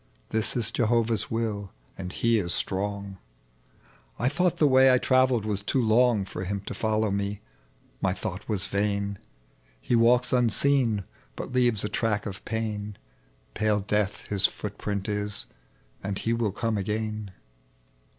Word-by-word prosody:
Tiiis 110 0 +2
ia 120 - +1
Jehovah's 115 -2 +1
will, 110 -4 -3 0.2
and 90 -1 -6
He 115 +2 +2
is 85 -4 -1
strong; 100 0 -3 1.0
I 125 - +1
thought 180 +3 +1
the 155 - +4
way 130 -1 +6
I 125 - +5
travelled 130 -3 +3
was 105 -2 -1
too 120 +6 0
long 115 -2 +3
For 90 - -6
Ilim 100 +1 -4
to - - -4
follow 110 -1 0
me: 100 +1 -2 0.6
my 95 - +2
thought 100 +1 -5
was 100 -3 0
yain 100 0 0
1 100 - -7 0.6
He 120 - 0
walks 120 +2 +4
unseen, 120 -2 +3 0.3
but - - -6
leav^ 120 -4 +2
a 105 - -1
track 105 -3 0
of 95 -1 -6
pain, 105 -2 -3 0.6
Pale 105 -1 +1
Death 105 0 -1
His 100 -1 +3
footprint 100 0 -4
is, 105 -1 -1 0.6
and 100 0 -2
He 115 - -1
will 115 -3 0
come 110 +1 -1
again 105 +1 -3
105 Hz, 150 wpm, -27 LUFS, 100-115 Hz, 1.0 s, way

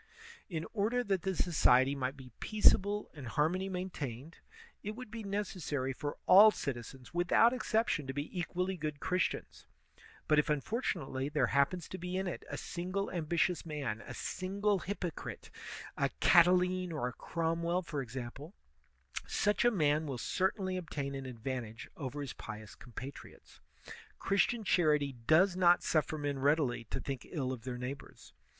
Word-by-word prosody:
In 165 -3 -3
order 230 +3 +1
that 195 -5 0
the 190 +1 -1
society 135 -6 +4
might 135 0 -2
be 130 -2 -12
peaceable 210 -1 +3
and 140 -5 -8
har 150 +6 +2
mony 185 +2 -2
maintained, 165 -6 -5 0.4
it 210 +1 -5
would 250 -2 -9
be 230 -1 -5
necessary 185 -10 -2
for 145 +2 -4
all 205 +4 +9
citizens 130 - -5
without 175 +7 +4
exception 225 - 0
to 130 - -3
be 145 +6 -5
equally 180 +2 -1
good 150 -2 -4
Christians; 180 +3 -2 0.6
but 155 -1 +5
if 150 - +1
unfortunately 150 - -1
there 150 -4 +2
happens 140 +5 +2
to 185 - -6
be 180 +2 -3
in 190 - -1
it 180 - -4
a - - -4
single 185 +3 -3
ambitious 170 +1 0
man, 140 -9 -3
a - - -8
single 200 +2 -1
hypocrite, 180 -3 -5 0.4
a - - +1
Catiline 180 +1 +5
or 145 -6 -1
a 125 - -5
Cromwell 170 +4 -1
for 150 -3 -3
example, 130 - -7 0.7
such 205 0 +1
a 240 - +6
man 155 -7 +2
will 135 -3 -3
certainly 185 - 0
obtain 145 -6 -4
an 135 -1 -5
advantage 120 -2 -5
over 145 0 -5
his 140 - -5
pious 105 0 -8
compatriots. 130 +3 -10 0.6
Christian 215 +4 +1
charity 150 -7 +3
does 175 +4 +5
not 175 -1 +5
suflEer 155 -1 0
men 145 -2 -2
readily 140 -4 +2
to - - -4
think 135 -3 -5
ill 130 -6 -2
of 120 -2 -9
their 125 -1 -3
neighbors. 130 +3 -8
160 Hz, 155 wpm, -33 LUFS, 135-185 Hz, 0.7 s, all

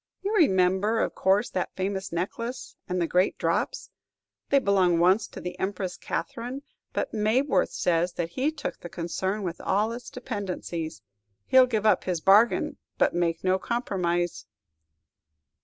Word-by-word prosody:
You 405 +2 -1
remember, 190 - +3
of - - 0
course, 195 +4 +2
that 185 - -3
famous 190 0 -3
necklace, 230 +9 -4
and 180 0 0
the 170 - +2
great 180 +3 +1
drops! - - -1 0.6
They 280 - +5
belonged 190 -8 +3
once 185 +5 +4
to - - -10
the 180 - -6
Empress 190 -1 -2
Catherine, 250 +8 -4 0.3
but - - -2
Mabworth 220 0 +2
says 175 0 0
that 170 -1 -3
he 265 - 0
took 295 -3 -5
the 175 - -8
concern 190 +5 -3
with 175 -2 -4
all 210 +4 +1
its 240 0 -7
dependencies; 185 - -5 0.4
he 260 - +5
'll 255 - +7
give 220 -3 -1
up 215 - +3
his 180 -3 -1
bargain, 205 +8 +4 0.2
but - - +3
make 170 -1 0
no 185 0 +2
compromise." 175 -8 -1
190 Hz, 155 wpm, -27 LUFS, 175-230 Hz, 0.6 s, ll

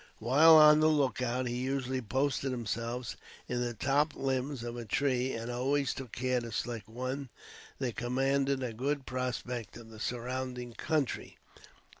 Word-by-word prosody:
While 145 +8 +7
on 150 -1 +8
the 155 - +5
lookout, 130 -4 +1
he 120 0 -2
usually 130 0 -1
posted 135 +4 0
himself 120 0 -3 0.3
in 125 0 -1
the 120 -1 -2
top 145 +6 +1
limbs 135 -1 -2
of 120 0 -5
a 120 - -5
tree 130 +2 0
and 115 +1 -4
always 135 +3 +1
took 130 -4 -8
care 125 0 0
to 115 -1 -7
select 115 -2 -4
one 130 +3 -4 0.5
that 125 -4 -3
commanded 135 +2 +1
a 120 -3 -3
good 135 +4 -2
prospect 125 -2 -4
of 115 -1 -12
the 110 - -11
surrounding 125 +1 -4
country. 150 +1 -2
125 Hz, 155 wpm, -31 LUFS, 120-135 Hz, 0.5 s, on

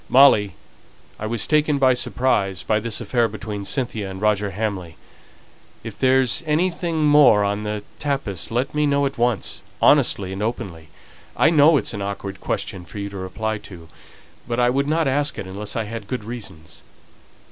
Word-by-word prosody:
"Molly, 110 -9 +5 0.6
I 110 - -3
was 115 -1 -2
taken 150 -1 +2
by 130 -2 +4
surprise 105 -7 0
by 110 +1 +1
this 110 0 -3
affair 120 -2 +1
between 105 -2 -6
Cynthia 110 -3 -2
and 95 0 -7
Roger 105 -1 +1
Hamley 95 -5 -4 0.9
if 115 -2 -7
there's 130 -2 +3
anything 165 0 0
more 145 -8 +6
on 100 +1 -1
the 105 -1 -4 0.2
tapis 135 - -2
let 125 +4 -1
me 150 0 +1
know 140 0 +2
at 135 -3 -4
once, 120 -5 0 0.2
honestly 95 -2 +3
and 95 - -5
openly. 90 -8 -4 0.5
I - - +4
know 155 0 +6
it's 115 - -2
an 100 - -5
awkward 100 -1 -5
question 90 - -3
for 85 - -12
you 100 0 -4
to 100 - -8
reply 110 +4 -3
to; 85 -6 -12 0.6
but 120 0 -2
I 120 0 +3
wouldn't 140 +4 0
ask 145 +2 0
it - - -5
unless 100 +3 -5
I 115 - 0
had 110 -1 -7
good 125 0 -4
reasons." 100 -9 -9
110 Hz, 170 wpm, -22 LUFS, 100-130 Hz, 0.9 s, more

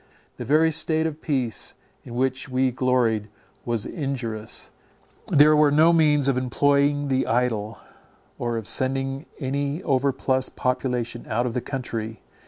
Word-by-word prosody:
The - - -6
very 155 +3 +4
state 160 +1 +1
of 160 -1 -4
peace 130 -7 -1 0.3
in 120 - -9
which 130 +1 -1
we 130 0 +1
gloried 120 -4 +1 0.4
was 115 -3 -1
injurious; 120 - -4 0.6
there 150 +1 +6
were 150 -1 +5
no 155 +4 +5
means 150 -4 +4
of 130 -2 +2
employing 145 +3 +2
the 130 -1 0
idle, 115 -3 0 0.6
or 120 -1 -1
of 110 -2 -5
sending 135 +3 -1
any 140 +4 -2
overplus 130 -2 +1
of - - -15
population 125 -2 -2
out 120 +2 0
of 120 - -2
the 125 - -1
country. 115 -4 -5
130 Hz, 145 wpm, -24 LUFS, 120-145 Hz, 0.6 s, there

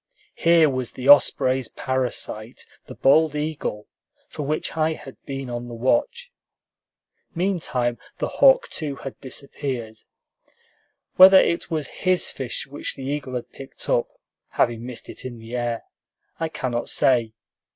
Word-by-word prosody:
Here 165 -1 +4
was 130 -3 -3
the 130 +1 -5
osprey's 130 -3 +5
parasite, 125 -3 -3 0.2
the - - -9
bald 150 +2 +4
eagle, 150 -8 -3 0.4
for 155 - -7
which 150 +3 -2
I 160 0 +1
had 135 -4 -11
been 135 -1 -5
on 120 0 -5
the 120 - -7
watch. 480 - 0 1.0
Meantime, 160 -10 -1 0.2
the - - -1
hawk - - +7
too 145 -3 -5
had 135 -1 -8
disappeared. 130 -4 -5 1.2
Whether 190 +1 +10
it 170 - 0
was 155 -4 -2
his 185 -1 +2
fish 130 0 -4
which 140 +1 -5
the 135 - -8
eagle 135 -2 -3
had 125 - -5
picked 135 - -10
up - - +2 0.4
(having 120 0 0
missed 125 -2 -8
it - - -9
in 125 -2 -7
the 115 +2 -8
air) 120 -1 -2 0.6
I 165 -1 -1
cannot 125 -6 -3
say. 120 -4 +2
135 Hz, 140 wpm, -23 LUFS, 120-155 Hz, 1.2 s, Whether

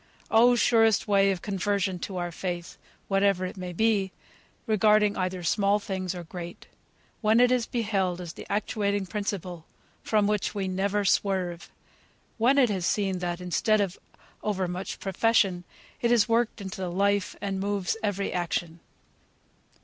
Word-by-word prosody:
Oh! 240 +2 +6
surest 225 -3 +3
way 200 -1 +4
of 190 -2 -2
conversion 195 -2 -1
to 185 +1 -5
our 175 -1 -3
faith, 175 0 -5 0.3
whatever 195 -1 +2
it 185 - -6
may 180 -2 -6
be, 200 0 +1 0.5
regarding 215 -2 +3
either 185 -1 -2
small 200 +4 +2
things, 190 -3 -4
or 175 - -6
great, 170 +1 -8 0.6
when 220 +1 +4
it 245 0 +5
is 250 -2 +1
beheld 195 -6 -1
as 175 -2 -7
the - - -10
actuating 205 -1 -1
principle, 185 -4 -4 0.3
from 210 -2 +2
which 210 0 -1
we 195 -2 -1
never 200 +2 0
swerve! 185 -3 0 0.7
When 255 +5 +4
it 250 -5 +4
is 185 -3 -1
seen 195 -3 0
that, 175 -1 -3
instead 180 +4 +1
of 195 -2 -1 0.4
over 190 -3 -1
much 180 +2 -5
profession, 195 -2 +1 0.4
it 235 - +2
is 235 -3 +4
worked 230 -1 +1
into 190 -1 -6
the 185 - -2
life, 200 +2 +1
and 195 -1 -3
moves 200 -1 -1
every 200 -2 -1
action! 175 -1 -2
195 Hz, 155 wpm, -27 LUFS, 180-210 Hz, 0.7 s, Oh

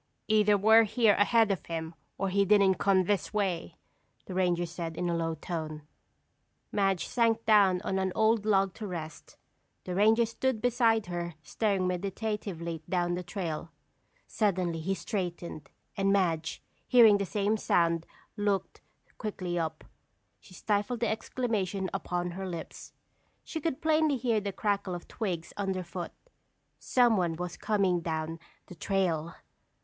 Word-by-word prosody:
"Either 210 -1 +4
we're 220 +3 +7
here 220 0 +3
ahead 220 +1 +3
of 190 -6 -2
him, 165 0 -4 0.2
or 195 - -1
he 200 +1 +3
didn't 200 -1 +4
come 190 -2 +3
this 200 +1 -1
way," 180 -5 -1 0.5
the 185 - -7
ranger 175 -2 +1
said 165 -1 -6
in 180 - -1
a 170 - 0
low 165 -1 -1
tone. 155 -2 -5 0.9
Madge 195 -3 +1
sank 230 -2 +1
down 200 -4 +5
on 190 -1 -1
an 190 -1 0
old 220 -1 +3
log 195 -3 +2
to 215 - -6
rest. 160 -4 -7 0.5
The 180 - -5
ranger 220 +5 +4
stood 230 +1 -1
beside 230 -2 +2
her 175 -1 -4
staring 200 +1 0
meditatively 180 -3 -3
down 175 -1 +1
the 180 - -2
trail. 170 -3 -4 0.6
Suddenly 185 -6 0
he 190 +5 -1
straightened, 175 -7 -5 0.3
and 195 0 +1
Madge, 165 -5 0 0.2
hearing 225 -5 +7
the 200 - 0
same 205 +3 +1
sound, 170 -5 +1 0.3
looked 205 -2 -1 0.4
quickly 185 -5 -3
up. 160 -1 -3 0.6
She 185 - -16
stifled 210 +5 -1
the 235 - +2
exclamation 210 -5 -2
upon 175 0 -2
her 190 +2 -5
lips. 170 -2 -7 0.5
She 320 - -5
could 320 -2 -2
plainly 310 -2 +3
hear 235 -3 +1
the 200 0 -3
crackle 195 -2 -1
of 175 - -9
twigs 175 -6 -4
underfoot. 185 -3 -3 0.7
Someone 215 -10 +2
was 175 +1 -5
coming 195 -4 +1
down 160 0 -3 0.3
the - - -11
trail! 170 -2 -1
195 Hz, 145 wpm, -29 LUFS, 175-215 Hz, 0.9 s, we're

